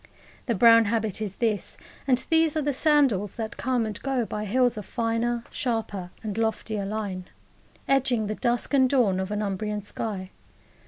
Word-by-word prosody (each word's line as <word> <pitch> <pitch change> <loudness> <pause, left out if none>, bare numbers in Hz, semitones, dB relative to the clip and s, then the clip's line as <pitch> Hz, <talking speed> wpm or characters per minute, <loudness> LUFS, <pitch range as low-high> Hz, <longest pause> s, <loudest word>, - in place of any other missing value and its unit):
The 235 - +1
brown 230 +2 +7
habit 220 -1 -1
is 200 -3 -4
this, 220 -4 -1 0.3
and 255 -2 +4
these 320 -1 +3
are - - +1
the 290 0 0
sandals, 265 - +2
that 225 -1 -5
come 250 -2 0
and 215 -1 -6
go 265 -4 0
by 210 0 -4
hills 245 +4 +2
of 210 - -5
finer, 235 0 -1
sharper, 220 -7 -3
and 215 0 -3
loftier 220 -2 -1
line, 200 -3 -4 0.6
edging 255 -5 +2
the 210 - -2
dusk 240 +5 0
and 260 -2 +5
dawn 225 -9 +2
of 190 0 -3
an 210 0 -2
Umbrian 210 +1 -3
sky. 200 -2 -4
225 Hz, 170 wpm, -26 LUFS, 210-245 Hz, 0.6 s, brown